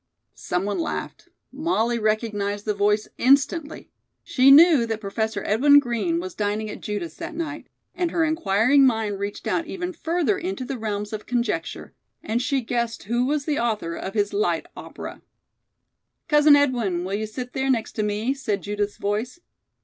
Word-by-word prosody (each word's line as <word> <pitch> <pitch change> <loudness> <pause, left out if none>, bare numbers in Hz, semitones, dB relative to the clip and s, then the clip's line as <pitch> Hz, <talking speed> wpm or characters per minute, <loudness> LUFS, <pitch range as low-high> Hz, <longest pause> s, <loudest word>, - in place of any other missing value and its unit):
Some 180 +2 -3
one 205 0 -2
laughed. 330 - -5 0.2
Molly 255 -6 0
recognized 210 -2 -1
the 210 - 0
voice 210 +1 +1
instantly. 280 +4 +2 0.3
She 260 +1 +4
knew 295 -4 +7
that 225 -1 -2
Professor 220 +1 -3
Edwin 285 +7 +5
Green 225 -11 +1
was 185 0 -6
dining 210 +1 -2
at - - -9
Judith's 190 -6 -5
that 335 0 -6
night, 310 -2 -5 0.3
and 355 -1 -1
her 330 -1 +1
inquiring 280 - +3
mind 220 -4 -1
reached 200 +1 -5
out 330 - -1
even 360 0 -4
further 345 +4 0
into 350 -8 -4
the 265 -1 -5
realms 210 -1 -3
of 215 - -6
conjecture, 245 -1 -2 0.3
and 225 +3 -1
she 270 +1 0
guessed 235 -1 -2
who 240 +4 0
was 290 0 -1
the 300 -2 0
author 215 -8 -1
of 190 +4 -6
his 205 -1 0
light 175 -5 0
opera. - - -9 1.1
"Cousin 300 -2 +6
Edwin, 240 -11 +1
will 190 +2 -4
you 215 +2 -2
sit 245 +3 -7
there, 265 0 -1
next 235 -4 0
to - - -3
me?" 210 +5 -1
said 215 -8 -3
Judith's 205 0 -3
voice. 215 +9 -3
230 Hz, 170 wpm, -24 LUFS, 205-285 Hz, 1.1 s, knew